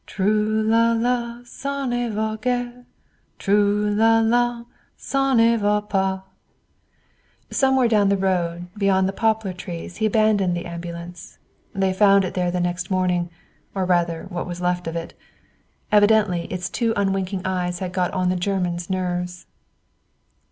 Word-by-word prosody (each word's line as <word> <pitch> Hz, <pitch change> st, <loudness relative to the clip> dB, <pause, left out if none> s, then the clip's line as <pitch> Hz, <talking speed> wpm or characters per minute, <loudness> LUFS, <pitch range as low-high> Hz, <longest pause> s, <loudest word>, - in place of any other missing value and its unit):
Trou 215 Hz, +2 st, +1 dB
là 230 Hz, +1 st, +4 dB
là, 240 Hz, 0 st, -1 dB
ça 280 Hz, +2 st, -4 dB
ne 240 Hz, -1 st, -1 dB
va 215 Hz, 0 st, -2 dB
guère; 245 Hz, 0 st, -2 dB, 0.5 s
Trou 205 Hz, +1 st, +2 dB
là 225 Hz, +1 st, +4 dB
là, 240 Hz, 0 st, +1 dB, 0.3 s
ça 270 Hz, -1 st, 0 dB
ne 230 Hz, 0 st, +5 dB
va 210 Hz, -1 st, +2 dB
pas. 190 Hz, -2 st, -1 dB, 1.3 s
Somewhere 265 Hz, -2 st, +3 dB
down 210 Hz, -3 st, +3 dB
the 200 Hz, -, +2 dB
road 175 Hz, -2 st, -1 dB
beyond 195 Hz, -2 st, +2 dB
the 195 Hz, -, -3 dB
poplar 220 Hz, -3 st, 0 dB
trees 175 Hz, -1 st, -7 dB
he 220 Hz, -, +1 dB
abandoned 205 Hz, -4 st, +2 dB
the 175 Hz, -, -5 dB
ambulance. 170 Hz, 0 st, -8 dB, 0.4 s
They 190 Hz, -1 st, +1 dB
found 195 Hz, 0 st, +5 dB
it 180 Hz, -, -5 dB
there 180 Hz, -1 st, 0 dB
the 180 Hz, +1 st, -1 dB
next 175 Hz, 0 st, -2 dB
morning, 180 Hz, -2 st, 0 dB, 0.5 s
or 190 Hz, -1 st, 0 dB
rather 170 Hz, -2 st, +1 dB
what 175 Hz, -1 st, -4 dB
was 175 Hz, -1 st, -6 dB
left 180 Hz, -1 st, -1 dB
of 165 Hz, -, -4 dB
it. 165 Hz, 0 st, -5 dB, 0.8 s
Evidently 205 Hz, -4 st, +4 dB
its 180 Hz, -1 st, -4 dB
two 230 Hz, -2 st, 0 dB
unwinking 195 Hz, -1 st, -1 dB
eyes 180 Hz, -1 st, -1 dB
had 180 Hz, 0 st, -5 dB
got 180 Hz, -1 st, 0 dB
on 185 Hz, -1 st, 0 dB
the 185 Hz, -, +1 dB
Germans' 180 Hz, -2 st, -2 dB
nerves. 180 Hz, -1 st, -3 dB
195 Hz, 150 wpm, -22 LUFS, 180-220 Hz, 1.3 s, ne